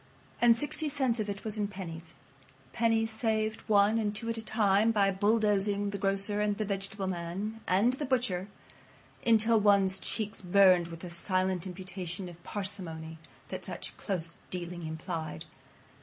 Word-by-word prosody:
And 235 -1 +6
sixty 295 +4 +1
cents 265 -5 0
of 210 -1 -2
it 200 0 -5
was 215 -1 -1
in 205 - 0
pennies. 170 -4 -8 0.6
Pennies 225 -1 +1
saved 220 -1 -1
one 210 +2 +4
and 210 -1 -1
two 230 +2 -3
at 230 - -1
a - - -3
time 215 0 +2
by 200 -3 +2
bulldozing 205 0 +2
the 200 - -5
grocer 195 +2 +5
and 205 -1 0
the 215 - -2
vegetable 195 0 -3
man 190 +5 -4
and 205 +7 +3
the 290 +3 -4
butcher 230 -8 -1 0.8
until 225 0 +4
one's 200 -2 +3
cheeks 210 0 -3
burned 185 -2 +5
with 165 -1 -9
the 180 - -8
silent 185 +1 -1
imputation 185 0 -6
of 175 0 -14
parsimony 165 -6 -2 0.3
that - - -6
such - - -6
close 170 -4 -3
dealing 175 -2 -5
implied. 160 - -5
200 Hz, 155 wpm, -30 LUFS, 185-220 Hz, 0.8 s, And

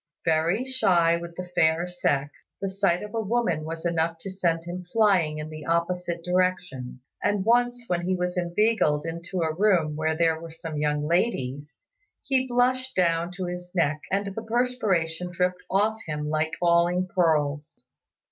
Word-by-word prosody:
Very 165 +8 +2
shy 180 -10 +3
with 170 0 -6
the 180 0 -6
fair 160 0 +3
sex, 145 -5 -2
the 195 - -2
sight 190 -2 +1
of 210 +1 -8
a 225 - 0
woman 205 -7 0
was 165 +1 -6
enough 165 -1 0
to 195 - -5
send 170 -3 0
him 175 +1 -6
flying 180 -5 +2
in 155 +1 -6
the 155 -1 -8
opposite 170 0 -1
direction; 180 -9 -1 0.2
and 205 -2 +1
once 245 +1 +2
when 175 -5 -1
he 185 +2 0
was 180 0 -2
inveigled 175 -4 +1
into 170 +2 -4
a 160 -1 0
room 175 -5 +2
where 160 +1 0
there 165 -1 +2
were 165 - -8
some 160 -1 -6
young 150 0 0
ladies, 145 - -1 0.4
he 260 -1 +1
blushed 255 +1 +1
down 170 -1 +1
to 185 0 -4
his 180 0 -6
neck 155 -3 +1
and 195 0 -1
the 225 - -4
perspiration 215 -8 0
dripped 180 +1 -1
off 215 +3 +2
him 150 -1 -3
like 155 +1 0
falling 175 +1 +3
pearls. 155 -4 0
175 Hz, 165 wpm, -26 LUFS, 160-195 Hz, 0.4 s, shy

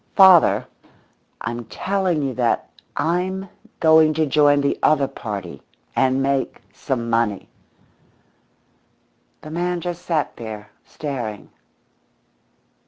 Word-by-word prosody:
_ - - -39
Father, 190 -4 +6 0.8
I'm 120 0 -4
telling 180 - -1
you 135 -2 -2
that 120 -1 0 0.3
I'm 185 +3 -1 0.3
going 160 -1 +5
to 160 0 +2
join 145 0 +4
the 140 - 0
other 145 -3 +3
party 100 - -7 0.3
and 130 0 +2
make 135 -1 -1
some 125 -4 -3
money!" 115 -3 0 1.9
The 155 - -10
man 175 +2 -1
just 175 0 -5
sat 165 -4 -1
there, 110 -3 -8
staring. 120 -8 -6
145 Hz, 105 wpm, -21 LUFS, 120-170 Hz, 1.9 s, Father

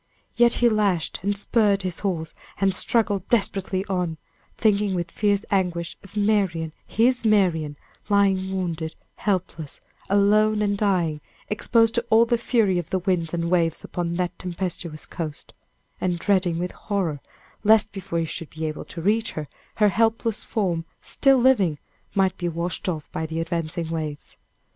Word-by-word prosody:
Yet 240 0 +5
he 240 - +3
lashed 205 -7 +1
and 200 +2 -1
spurred 205 -1 +2
his 180 -2 -3
horse, 170 -5 -2 0.3
and 195 -1 +3
struggled 205 -2 +1
desperately 195 -4 0
on, 180 -4 -2 0.4
thinking 205 -3 +2
with 170 -1 -3
fierce 205 -1 +1
anguish 175 -3 0
of 195 +2 -11
Marian, 195 -7 +1
his 245 +3 +2
Marian, 175 -9 +2 0.3
lying 195 -2 +2
wounded, 170 -4 -3 0.2
helpless, 170 -6 -2 0.3
alone 210 +2 +4
and 205 -1 +1
dying, 180 -7 +1 0.3
exposed 225 +1 +2
to 235 - 0
all 225 +1 +6
the 235 0 +1
fury 215 -7 +2
of 170 -2 -6
the 190 - +1
winds 180 -3 0
and 170 0 -2
waves 165 -3 +1
upon 170 -1 -3
that 180 0 -2
tempestuous 175 -3 -4
coast, 155 -4 -6 0.5
and 180 -1 0
dreading 180 -2 +1
with 180 +1 -2
horror, 185 -8 -2 0.4
lest 220 0 +5
before 190 -4 -4
he 165 - +1
should 160 0 -6
be 160 0 -5
able 155 -1 -4
to 165 - -8
reach 220 +4 +1
her, 155 - -4 0.3
her 210 -1 +4
helpless 225 +2 +1
form, 180 -6 -1 0.2
still 270 -1 +4
living, 235 - +3 0.4
might 190 -2 +2
be 175 -1 -1
washed 170 +2 -2
off 155 -4 -4
by 160 - -3
the 160 +1 -3
advancing 165 0 -3
waves. 155 -3 -5
185 Hz, 160 wpm, -24 LUFS, 170-210 Hz, 0.5 s, all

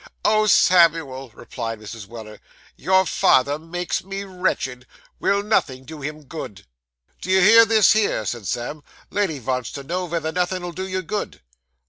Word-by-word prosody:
'Oh, 215 0 +3
Samuel!' 165 -9 +3
replied 115 0 -7
Mrs. 110 -1 -9
Weller, 110 -1 -10 0.4
'your 190 +4 +2
father 140 -2 +2
makes 175 +3 -4
me 195 +1 -5
wretched. 180 -10 -3 0.3
Will 200 +1 +1
nothing 130 -11 0
do 155 +2 -10
him 150 +2 -6
good?' 135 - -9 0.6
'Do 185 - -7
you 190 0 +4
hear 225 +4 +8
this 220 -1 +5
here?' 210 - 0
said 105 -1 -4
Sam. 120 - -4 0.3
'Lady 195 -7 -1
vants 125 -2 -3
to 140 - -7
know 180 +5 -3
vether 165 -1 -2
nothin' 180 +1 -1
'ull 175 - -5
do 190 +2 -5
you 185 0 -3
good. 205 +5 -5
165 Hz, 160 wpm, -22 LUFS, 130-190 Hz, 0.6 s, hear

